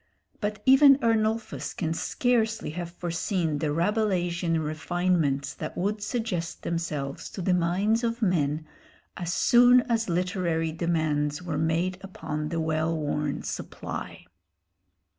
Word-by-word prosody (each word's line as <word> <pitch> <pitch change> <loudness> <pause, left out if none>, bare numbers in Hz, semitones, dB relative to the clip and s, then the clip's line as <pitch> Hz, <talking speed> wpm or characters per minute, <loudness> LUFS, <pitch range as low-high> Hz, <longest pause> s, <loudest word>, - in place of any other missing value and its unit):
But 210 -1 -3
even 270 +1 +8
Ernulphus 220 - 0
can 160 -2 -1
scarcely 225 +1 0
have 175 +1 -5
foreseen 170 -2 -2
the 155 - -1
Rabelaisian 175 -2 0
refinements 155 -2 0
that 155 - -6
would 205 +4 -1
suggest 205 -6 -3
themselves 150 -5 -3
to - - -9
the 185 0 +1
minds 190 +7 +1
of 230 0 -1
men 155 -7 +1 0.5
as 175 -1 -3
soon 245 +5 +6
as 230 -4 -1
literary 175 -2 0
demands 155 -2 -1
were 160 -4 -2
made 170 +3 0
upon 155 -5 -5
the 165 0 -2
well 160 +1 0
worn 150 -1 -2
supply. - - -6
175 Hz, 120 wpm, -27 LUFS, 160-210 Hz, 0.5 s, even